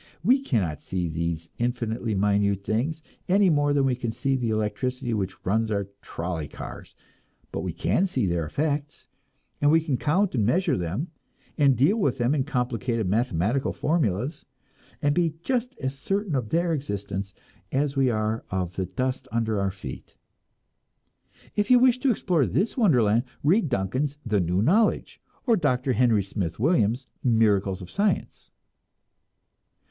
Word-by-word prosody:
We 250 +8 +5
cannot 100 - -1
see 90 -2 -2
these 85 0 -3
infinitely 115 -2 -1
minute 100 0 +1
things, 135 +11 -1 0.3
any 195 -1 +5
more 145 -1 +2
than 140 -1 +3
we 130 - +2
can 120 -1 -3
see 135 +4 0
the 125 -3 -1
electricity 115 +4 -1
which 95 -3 -3
runs 110 +3 +1
our 100 -2 -1
trolley 85 -3 -4
cars; - - -9 0.6
but - - -3
we - - -3
can 195 - +1
see 130 - 0
their 85 -2 0
effects, 145 - -2 0.5
and 145 - +4
we 160 +2 +6
can 155 -5 -1
count 180 +9 +1
and 115 -5 +1
measure 160 - +2
them, 100 - -3 0.4
and 140 -4 +4
deal 155 - +4
with 140 - +1
them 120 +2 +1
in 135 -4 0
complicated 125 -5 -1
mathematical 115 - +1
formulas, 140 - -1 0.6
and 145 0 +3
be 165 -1 +1
just 250 0 -1
as 135 0 -4
certain 195 +2 -1
of 125 -6 -1
their 170 +1 +1
existence 100 -8 -4 0.4
as 140 +1 0
we 135 -2 +3
are 110 0 -1
of 90 -2 -3
the 95 -1 -1
dust 130 +8 -2
under 110 -2 0
our 100 0 +1
feet. 95 -9 -9 1.4
If 205 -1 0
you 250 - +8
wish 250 0 +4
to 270 - +2
explore 180 - +2
this 205 +5 0
wonderland, 125 - +3 0.2
read 165 +3 +3
Duncan's 130 +7 -1
"The 110 -3 +1
New 90 +3 +1
Knowledge," 205 - +2 0.2
or 235 -4 +4
Dr. 130 - +1
Henry 115 -3 +3
Smith 95 -3 -4
Williams' 130 - +2 0.2
"Miracles 100 -5 +2
of 90 - -10
Science." 205 +1 -1
125 Hz, 155 wpm, -25 LUFS, 100-150 Hz, 1.4 s, you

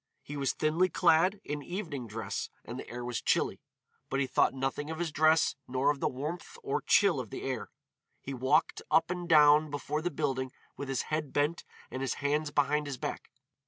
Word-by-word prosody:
He 145 - -7
was 140 -2 0
thinly 160 +4 +2
clad, 180 +4 +3
in 150 0 -4
evening 160 - -5
dress, 110 +1 -4 0.2
and - - -6
the - - -8
air 120 +1 -5
was 120 -1 -2
chilly, - - +1 0.5
but 135 - 0
he 140 - +2
thought 130 0 +2
nothing 135 +3 -2
of 160 - -4
his 170 -1 -2
dress 155 +1 +4
nor 130 +3 +2
of 145 - -5
the - - +1
warmth 160 - -5
or 420 +1 -1
chill 195 -9 +4
of 120 -4 -5
the - - -6
air. 130 -3 -3 0.5
He 135 - -6
walked 130 0 +2
up 165 - +3
and 180 -1 -4
down 150 -1 +6
before 145 +1 -3
the 175 - 0
building 130 -4 -2 0.2
with 140 - -6
his 135 - 0
head 155 -3 -1
bent 150 +4 0 0.3
and 130 - -4
his 135 - -1
hands 145 +1 0
behind 145 +1 +1
his 140 -2 -4
back. - - -5
145 Hz, 200 wpm, -31 LUFS, 135-160 Hz, 0.5 s, down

